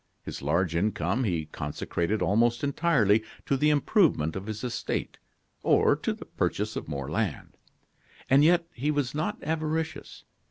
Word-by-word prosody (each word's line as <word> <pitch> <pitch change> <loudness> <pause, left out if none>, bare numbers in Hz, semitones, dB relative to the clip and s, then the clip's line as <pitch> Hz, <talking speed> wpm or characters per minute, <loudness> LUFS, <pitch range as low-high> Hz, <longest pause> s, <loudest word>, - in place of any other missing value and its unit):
His - - -7
large 85 +4 0
income 110 +6 0
he 85 -6 -1
consecrated 85 +6 -2
almost 120 +4 +2
entirely 135 - +3 0.2
to 140 - +1
the 150 +3 +3
improvement 145 - +2
of 95 +2 -5
his 110 +1 -5
estate 125 -2 -3 0.4
or - - +4
to - - -2
the - - -7
purchase - - -2
of - - -5
more 70 -3 -4
land. 100 -2 -2 0.7
And 135 +2 +5
yet, 170 +2 +4
he 140 +5 -2
was 145 -4 0
not 155 +1 -2
avaricious. 160 -1 -3
120 Hz, 150 wpm, -27 LUFS, 95-150 Hz, 0.7 s, And